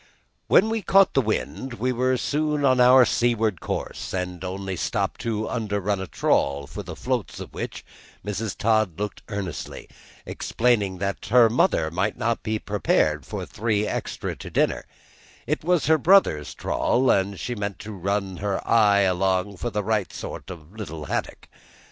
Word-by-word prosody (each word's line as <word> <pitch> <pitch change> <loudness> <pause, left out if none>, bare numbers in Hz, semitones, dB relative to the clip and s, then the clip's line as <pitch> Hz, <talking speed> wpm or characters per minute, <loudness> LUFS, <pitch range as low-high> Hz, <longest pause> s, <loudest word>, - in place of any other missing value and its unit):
When 220 - +5
we 225 -1 -1
caught 195 +1 +4
the 135 - +4
wind 120 +3 -3
we 125 +2 -1
were 130 +1 +1
soon 150 +2 0
on 130 -1 +4
our 125 +1 +7
seaward 115 -7 +1
course, - - -4
and 90 -1 -4
only 95 +1 -4
stopped - - -2
to 110 -2 -2
underrun 100 -3 -1
a 95 - -5
trawl, 70 -3 +1
for - - -7
the - - -8
floats - - -3
of - - -9
which - - -6 0.4
Mrs. 105 0 -3
Todd 110 -6 +1
looked 105 -2 -4
earnestly, 100 -6 -5 0.4
explaining 105 -6 0
that 100 +1 -3
her 115 0 +6
mother 80 -9 +2
might 95 +5 -1
not 115 +1 -1
be 110 0 -1
prepared 80 -9 0
for - - -5
three 105 -1 -1
extra - - -3
to - - -8
dinner; - - 0 0.6
it - - -2
was 175 -2 +2
her 160 +1 +4
brother's 150 - +3
trawl, 130 +1 +1
and 95 -1 0
she 120 - -3
meant 100 -3 -4
to 110 0 -8
just 95 -4 -11
run 100 -1 -1
her 100 0 -3
eye 105 -3 +5
along 95 +1 +1
for 120 - -3
the 105 -2 -2
right 105 -2 0
sort - - -7
of 90 -4 -8
a - - -16
little 80 -8 -6
haddock. - - -4
105 Hz, 175 wpm, -24 LUFS, 95-120 Hz, 0.6 s, our